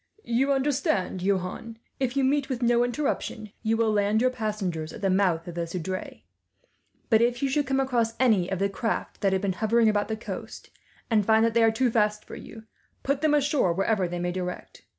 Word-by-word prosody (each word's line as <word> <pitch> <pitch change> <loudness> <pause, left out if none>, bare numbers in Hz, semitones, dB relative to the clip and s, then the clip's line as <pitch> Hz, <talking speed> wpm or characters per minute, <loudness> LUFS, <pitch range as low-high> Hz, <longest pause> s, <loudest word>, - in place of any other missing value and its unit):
"You 255 +4 +1
understand, 270 - 0
Johan, 195 +4 -2 0.2
if 260 0 -1
you 275 - +3
meet 275 +1 +1
with 250 -2 -2
no 240 0 +4
interruption, 245 -4 -3
you 225 0 +1
will 225 -1 +2
land 205 +1 +2
your 255 +2 +2
passengers 200 -9 -3
at - - -10
the 195 - +2
mouth 180 -4 +1
of 175 - -6
the 170 0 -3
Seudre; 185 +2 -5 0.9
but 220 0 +5
if 240 +2 +1
you 275 - +2
should 290 0 0
come 270 0 +1
across 240 -4 0
any 215 -8 +3
of 190 - 0
the 200 +2 +1
craft 225 +3 -3
that 195 -2 +2
have 190 +1 0
been 195 -2 0
hovering 220 +3 +2
about 205 -1 0
the 220 0 -3
coast, 220 - -8 0.4
and 215 -2 +4
find 220 +2 +4
that 230 - +1
they 235 - +3
are 225 - +6
too 240 +2 +1
fast 210 -1 +1
for - - -9
you, 220 0 -11 0.4
put 280 +1 0
them 310 -1 +3
ashore 285 - +2
wherever 195 +1 +1
they 175 +1 -4
may 175 0 -2
direct. 180 0 -6
220 Hz, 210 wpm, -26 LUFS, 190-250 Hz, 0.9 s, are